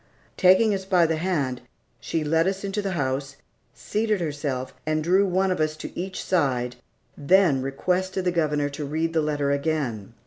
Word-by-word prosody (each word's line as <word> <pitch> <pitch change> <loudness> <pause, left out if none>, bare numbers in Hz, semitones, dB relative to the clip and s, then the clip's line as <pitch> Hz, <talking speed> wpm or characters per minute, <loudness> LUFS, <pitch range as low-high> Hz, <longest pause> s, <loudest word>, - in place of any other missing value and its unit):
Taking 190 +4 +5
us 190 -1 -2
by 185 -3 +3
the 160 0 0
hand, 155 -8 -1 0.4
she 165 -2 -2
led 165 +3 +2
us 195 +1 -2
into 200 +1 -2
the 195 -2 -2
house, 135 -2 -2 0.4
seated 215 -1 -1
herself 145 -5 -3
and 155 0 -1
drew 190 +4 +3
one 190 +1 +1
of 180 - -1
us 155 0 0
to - - -8
each 185 +2 -4
side, 130 -8 0 0.4
then 155 -2 +3
requested 185 +7 -1
the 180 - +2
Governor 150 -4 0
to 145 +1 -6
read 160 +3 -2
the 160 - +2
letter 145 -2 0
again. 140 -8 -2
160 Hz, 175 wpm, -25 LUFS, 140-185 Hz, 0.4 s, Taking